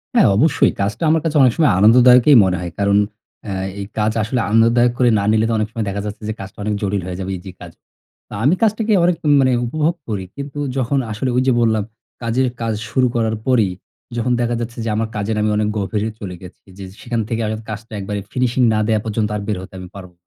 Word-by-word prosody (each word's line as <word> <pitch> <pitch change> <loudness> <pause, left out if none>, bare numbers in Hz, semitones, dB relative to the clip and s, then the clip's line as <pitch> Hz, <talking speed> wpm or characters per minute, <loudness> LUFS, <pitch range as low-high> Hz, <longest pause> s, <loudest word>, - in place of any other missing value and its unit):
হ্যাঁ, 230 - +6
অবশ্যই। 160 +8 +3
কাজটা 100 +8 -2
আমার 160 0 +3
কাছে 160 -1 -1
অনেক 125 -3 +5
সময় 155 -3 +4
আনন্দদায়কই 125 +6 +6
মনে 90 -1 0
হয়। 85 -1 -5
কারণ, 100 0 +3 0.5
এ - - -3 0.3
এই 100 - -4
কাজ 105 +1 +2
আসলে 120 +4 -1
আনন্দদায়ক 115 +2 +4
করে 125 -2 +4
না - - -1
নিলে 110 0 +2
তো - - 0
অনেক 110 -1 0
সময় 115 -2 -3
দেখা 100 +1 -3
যাচ্ছে 105 +1 -6
যে, - - -1
কাজটা 95 0 -9
অনেক 105 +1 -1
জটিল 100 -1 -1
হয়ে 90 -1 -5
যাবে, 95 0 -4
ইজি 95 +2 -10
কাজ। - - -9 0.6
তা - - -11
আমি 155 +7 +4
কাজটাকে 220 0 +2
অনেক 180 - +2 0.3
মানে 130 -1 +3
উপভোগ 155 +6 0
করি। 100 -4 -3
কিন্তু 140 +1 -6 0.2
যখন 135 +2 0
আসলে 110 +5 -2
ঐযে 130 0 +3
বললাম, 110 -2 +2 0.4
কাজের 120 +3 +1
কাজ 115 -1 -1 0.2
শুরু 130 +2 +2
করার 110 -1 0
পরেই 115 -7 +3 0.5
যখন 120 +2 0
দেখা 120 0 0
যাচ্ছে 120 0 -6
যে, - - -1
আমার 110 +1 -1
কাজের 105 +1 -2
আমি 105 - +1
অনেক 105 0 +1
গভীরে 105 +2 -2
চলে 90 -3 -6
গেছি 90 0 -14
জি, 100 - -8
জি। 95 - -16
সেখান 120 -2 -2
থেকে 115 0 -1
আগাত 110 +1 -4
কাজটা 110 +1 -7
একবারে 100 +1 -4
ফিনিশিং 125 0 0
না 110 - +1
দেওয়া 110 -1 +1
পর্যন্ত 110 -1 -1
আর 105 - -3
বের 105 -3 -1
হতে 95 - -12
আমি 90 - -8
পারবো। 90 -2 -10
110 Hz, 225 wpm, -19 LUFS, 105-125 Hz, 0.6 s, হ্যাঁ